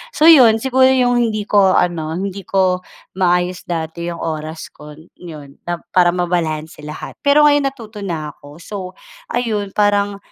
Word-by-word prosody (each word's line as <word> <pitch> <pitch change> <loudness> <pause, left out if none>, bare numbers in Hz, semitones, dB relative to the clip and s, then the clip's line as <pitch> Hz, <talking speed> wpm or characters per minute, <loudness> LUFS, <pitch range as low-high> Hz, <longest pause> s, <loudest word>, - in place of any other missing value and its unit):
So 300 - 0
yun 260 -9 +8
siguro 260 +2 +3
yung 245 -2 +2
hindi 215 -3 -1
ko 200 -3 +3
ano, 160 -2 -1
hindi 195 +1 -4
ko 185 -2 +1 0.4
maayos 180 0 0
dati 170 0 -4
yung 170 - -6
oras 155 0 -5
kon 150 +1 -13
yun 150 -5 -11
na 175 0 -2 0.2
para 180 -1 +4
mabalanse 165 -4 -2
lahat. 150 - -9
Pero 290 +1 +4
ngayon 290 -1 +3
natuto 225 -6 -12
na 160 -6 -4
ako 145 +1 -15
so 175 +5 -10 0.5
ayun 215 - -2
parang, 205 -1 +1
185 Hz, 155 wpm, -18 LUFS, 165-220 Hz, 0.5 s, yun